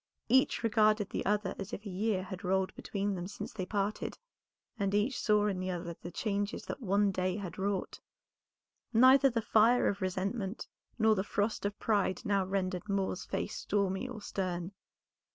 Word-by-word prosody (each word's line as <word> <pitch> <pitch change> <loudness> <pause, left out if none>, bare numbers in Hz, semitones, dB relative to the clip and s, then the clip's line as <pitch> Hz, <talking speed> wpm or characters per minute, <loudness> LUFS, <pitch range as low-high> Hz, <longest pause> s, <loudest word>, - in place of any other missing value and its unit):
Each 260 0 +3
regarded 215 -2 +3
the - - -2
other 210 -2 +1
as 195 0 -6
if 210 - -6
a - - -4
year 195 0 0
had 185 +1 -7
rolled 190 0 +1
between 200 0 -2
them 180 -1 -4
since 205 - -7
they 185 -4 -4
parted, 205 +1 -2 0.6
and 200 0 +1
each 225 +6 +1
saw 210 -1 +3
in 195 -3 0
the 185 0 -2
other 175 -1 -3
the 175 - -6
changes 205 +2 -2
that - - -6
one 200 -1 +2
day 185 0 -1
had 190 -5 -6
wrought. 195 -1 -2 0.9
Neither 260 +4 +7
the 230 -2 -1
fire 230 +3 +4
of 200 0 -1
resentment 190 +3 -2 0.3
nor 220 -1 +5
the 190 -2 0
frost 205 0 -1
of 205 - -6
pride 205 -3 0
now 200 -2 +2
rendered 185 +1 -2
Moor's 190 -1 -1
face - - -3
stormy 200 +4 -1
or 220 -4 -7
stern. 180 -2 -3
200 Hz, 175 wpm, -32 LUFS, 190-215 Hz, 0.9 s, Neither